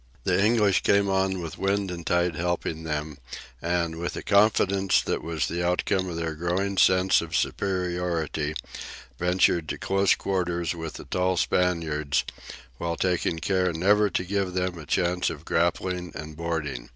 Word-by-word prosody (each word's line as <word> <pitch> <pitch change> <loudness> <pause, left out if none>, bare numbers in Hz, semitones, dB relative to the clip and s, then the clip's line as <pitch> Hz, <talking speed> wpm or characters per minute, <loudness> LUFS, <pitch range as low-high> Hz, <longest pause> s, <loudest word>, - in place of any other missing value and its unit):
The 100 - +2
English 105 -3 +3
came 100 0 +3
on 95 -1 0
with 80 - -7
wind 100 -1 0
and 85 -1 -6
tide 85 0 +2
helping 85 -1 -2
them 75 -1 -4 0.4
and, 85 -1 -1
with 85 +1 -3
the - - -6
confidence 100 -2 +3
that - - -2
was 80 -5 -2
the 85 +1 -2
outcome 90 +1 0
of 85 - -5
their 85 -1 -2
growing 90 +4 -1
sense 95 0 +4
of 85 -1 -5
superiority, 85 -1 -1 0.6
ventured 90 -2 +2
to - - -3
close 95 0 +2
quarters 85 -3 -1
with 80 -2 -6
the - - -9
tall 90 0 0
Spaniards, 80 -7 +1 0.6
while 85 -1 -2
taking 90 -2 0
care 90 +1 +1
never 100 +5 +3
to 90 - -1
give 95 0 -1
them 90 0 -1
the 80 -4 -10
chance 90 +2 +1
of 80 0 -8
grappling 90 +1 0
and 75 0 -7
boarding. 75 -7 -3
90 Hz, 160 wpm, -26 LUFS, 80-95 Hz, 0.6 s, sense